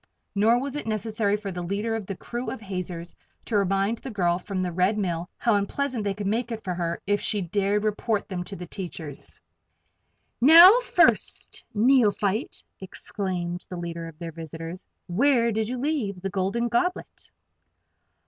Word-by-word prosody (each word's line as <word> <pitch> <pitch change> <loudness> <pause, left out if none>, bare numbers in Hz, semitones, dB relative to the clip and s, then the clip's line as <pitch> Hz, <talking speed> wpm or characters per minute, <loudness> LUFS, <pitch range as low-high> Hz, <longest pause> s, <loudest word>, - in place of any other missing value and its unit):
Nor 220 +4 +4
was 275 +2 -4
it 295 - -4
necessary 215 -1 0
for 205 -2 -5
the 180 -1 -5
leader 205 +6 -2
of 215 -4 -5
the 195 - -4
crew 240 +6 -5
of 265 - -5
hazers 180 -4 -5 0.3
to 225 - -2
remind 195 +3 +1
the 270 - -7
girl 175 -5 +1
from 185 0 -3
the 180 - -2
Red 185 +5 +2
Mill 175 -4 -2
how 230 - +2
unpleasant 230 +4 -1
they 200 -1 -1
could 205 0 -5
make 230 +4 -1
it 225 -1 -5
for 185 - -2
her 170 -1 -2
if 205 +1 +1
the 205 -3 -1
dared 200 +3 0
report 215 0 -1
them 180 -2 -4
to 200 - -7
the 180 - -7
teachers. 165 -6 -7 1.0
"Now, 340 - +10
First - - +2
Neophyte!" 215 -2 +2 0.2
exclaimed 185 -2 -4
the 180 - -5
leader 170 -1 -5
of 165 -2 -11
their 170 0 -6
visitors. 165 +2 -8 0.2
"Where 235 +5 +3
did 220 0 -1
you 250 +2 -3
leave 250 -9 -1
the 195 +1 -4
Golden 200 +5 0
Goblet?" 360 +6 -2
200 Hz, 170 wpm, -26 LUFS, 180-230 Hz, 1.0 s, Now